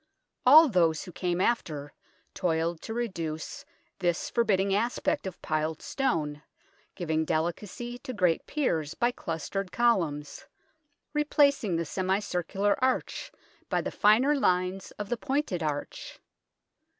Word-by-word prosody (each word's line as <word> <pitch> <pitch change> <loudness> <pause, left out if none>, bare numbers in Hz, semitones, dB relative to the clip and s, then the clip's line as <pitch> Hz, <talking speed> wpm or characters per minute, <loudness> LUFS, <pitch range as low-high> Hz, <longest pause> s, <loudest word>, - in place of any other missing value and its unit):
All 310 +5 +10
those 170 - +2
who 180 - -9
came 175 0 -2
after 155 -10 -1 0.4
toiled 165 -2 -1
to 225 - -5
reduce 170 -10 -4 0.3
this 175 -2 0
forbid 225 -5 +3
ding 195 +1 +1
aspect 220 -1 0
of 185 - -7
piled 155 0 -1
stone, 150 - -1 0.5
giving 160 -2 0
delicacy 195 +10 -3
to 255 - -6
great 180 -8 +1
piers 165 - -1
by 240 +1 +2
clustered 180 0 -4
columns, 165 -12 0 0.7
replacing 285 - +3
the 165 0 -1
semi 185 +4 0
circular 200 +3 -1
arch 260 0 0 0.4
by - - +1
the - - -3
finer 235 +8 +4
lines 185 -6 +1
of 205 -1 -5
the 240 - 0
pointed 270 - -1
arch. 150 -2 -4
185 Hz, 125 wpm, -28 LUFS, 165-235 Hz, 0.7 s, All